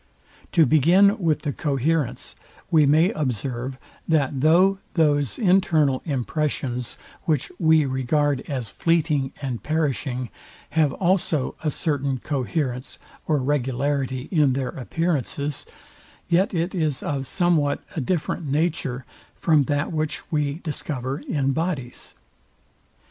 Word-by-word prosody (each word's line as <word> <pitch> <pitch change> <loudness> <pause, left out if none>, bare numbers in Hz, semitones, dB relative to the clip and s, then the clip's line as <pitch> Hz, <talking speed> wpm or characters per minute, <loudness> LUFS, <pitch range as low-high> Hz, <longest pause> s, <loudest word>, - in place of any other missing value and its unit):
To 165 -3 +6
begin 180 - +5
with 165 -5 +1
the 145 -3 -1
coherence; 145 0 -1 0.4
we 155 -3 +5
may 160 +7 +4
observe, 130 - -3 0.3
that 145 -4 +1
though 185 +6 +4 0.2
those 145 -5 +2
internal 165 - +3
impressions, 135 -3 -2 0.3
which 155 -6 0
we 160 -2 +4
regard 135 +1 +1
as 130 -7 -3
fleeting 155 -5 +1
and 125 -4 -3
perishing, 135 - -1 0.4
have 155 -3 +3
also 175 -6 0
a 155 - +1
certain 140 -3 -1
coherence 130 -1 -3 0.3
or 155 - +2
regularity 135 -1 -1
in 150 -7 +3
their 130 -1 -1
appearances, 145 0 -2 0.6
yet 180 +3 +2
it 175 0 -1
is 155 -7 -1
of 135 -2 -2
somewhat 165 -6 +1
a 160 - -1
different 165 +2 -2
nature, 140 -4 -1 0.3
from 155 -5 +3
that 145 +3 -1
which 155 -1 -2
we 145 -2 0
discover 140 -4 -3
in 140 -4 -1
bodies. 145 -5 -3
145 Hz, 115 wpm, -24 LUFS, 135-160 Hz, 0.6 s, To